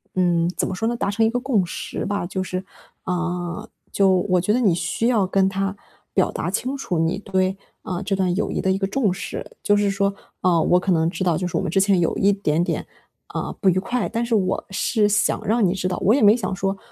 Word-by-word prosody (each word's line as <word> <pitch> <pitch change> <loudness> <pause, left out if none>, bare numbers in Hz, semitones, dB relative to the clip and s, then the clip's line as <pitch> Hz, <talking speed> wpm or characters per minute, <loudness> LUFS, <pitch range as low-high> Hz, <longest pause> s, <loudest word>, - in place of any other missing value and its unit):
嗯， 175 -2 +2
怎 - - 0
么 185 - -3
说 225 +4 -1
呢， 240 - 0
达 200 -3 -1
成 225 +2 +2
一 - - +3
个 245 +2 -1
共 245 -7 +1
识 170 - -5
吧， 205 -3 -2
就 190 +1 -3
是， 185 0 -4 0.4
啊， 180 +2 -3 0.2
就 195 -1 +3 0.2
我 180 -1 +3
觉 210 +4 +1
得 245 - +2
你 200 -8 +3
需 180 +7 -1
要 220 -6 +3
跟 190 0 +2
他 195 0 -2 0.4
表 - - +2
达 - - -3
清 260 +2 -2
楚， 180 -10 -2
你 165 +3 +1
对， 190 -1 0 0.3
啊， 180 -1 -4
这 200 0 -1
段 185 -2 +1
友 210 - -1
谊 - - -1
的 190 - +1
一 190 - +1
个 195 0 -1
重 210 -3 +1
视。 - - -6 0.2
就 205 - +4
是 205 0 +2
说， 200 0 0 0.3
啊， 175 -2 +3
我 180 - +4
可 185 +1 -1
能 165 -1 +2
知 185 - -3
道 170 -3 +2
就 180 - -2
是 - - -2
我 - - 0
们 - - -2
之 195 - +3
前 195 -1 +3
有 165 - 0
一 200 +1 +4
点 170 -5 0
点， - - -2 0.5
呃， - - -3
不 195 - +5
愉 185 - +2
快。 240 +5 -1
但 230 +1 -1
是 235 -1 +1
我 190 -3 0
是 210 +2 +1
想 205 0 +2
让 225 0 +2
你 180 - +1
知 185 -1 -2
道 180 - -2
我 210 - +5
也 280 - +1
没 210 +1 +7
想 210 -5 -3
说， 195 +1 -1
195 Hz, 275 characters per minute, -22 LUFS, 180-210 Hz, 0.5 s, 没